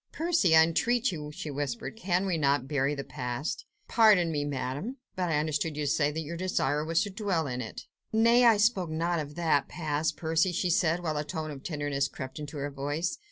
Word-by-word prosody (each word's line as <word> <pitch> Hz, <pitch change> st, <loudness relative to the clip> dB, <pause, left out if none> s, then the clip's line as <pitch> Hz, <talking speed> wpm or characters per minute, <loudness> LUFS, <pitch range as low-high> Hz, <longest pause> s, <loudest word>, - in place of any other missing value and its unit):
"Percy! 320 Hz, -, +2 dB
I 160 Hz, -, +8 dB
entreat 235 Hz, +9 st, +1 dB
you!" 150 Hz, -3 st, -6 dB
she 150 Hz, 0 st, -6 dB
whispered, 140 Hz, -, -4 dB
"can 190 Hz, -4 st, 0 dB
we 185 Hz, -3 st, 0 dB
not 140 Hz, -3 st, +1 dB
bury 140 Hz, 0 st, 0 dB
the 140 Hz, -, -4 dB
past?" 125 Hz, +2 st, -4 dB, 0.2 s
"Pardon 205 Hz, -7 st, +5 dB
me, 145 Hz, -2 st, -1 dB
Madame, 145 Hz, -, -3 dB, 0.2 s
but 180 Hz, -2 st, -1 dB
I 155 Hz, -, +2 dB
understood 155 Hz, 0 st, -1 dB
you 150 Hz, -, -1 dB
to 140 Hz, -, +1 dB
say 145 Hz, -2 st, +2 dB
that 155 Hz, +2 st, -3 dB
your 160 Hz, +2 st, -6 dB
desire 150 Hz, -5 st, 0 dB
was 165 Hz, +1 st, +1 dB
to 205 Hz, -, -5 dB
dwell 190 Hz, -5 st, -1 dB
in 125 Hz, -2 st, -3 dB
it." 115 Hz, -, -7 dB, 0.3 s
"Nay! 230 Hz, +2 st, +5 dB
I 230 Hz, -3 st, +6 dB
spoke 205 Hz, -5 st, +2 dB
not 165 Hz, +2 st, 0 dB
of 145 Hz, -1 st, -6 dB
that 160 Hz, -5 st, +1 dB
past, 155 Hz, -2 st, -2 dB
Percy!" 165 Hz, +3 st, +1 dB
she 175 Hz, +1 st, 0 dB
said, 170 Hz, 0 st, +2 dB
while 155 Hz, -3 st, -1 dB
a 150 Hz, -, -1 dB
tone 155 Hz, 0 st, -4 dB
of 140 Hz, -2 st, -8 dB
tenderness 145 Hz, -3 st, -1 dB
crept 130 Hz, +2 st, -7 dB
into 150 Hz, 0 st, -7 dB
her 145 Hz, 0 st, -3 dB
voice. 145 Hz, +5 st, -2 dB
160 Hz, 215 wpm, -29 LUFS, 145-180 Hz, 0.3 s, I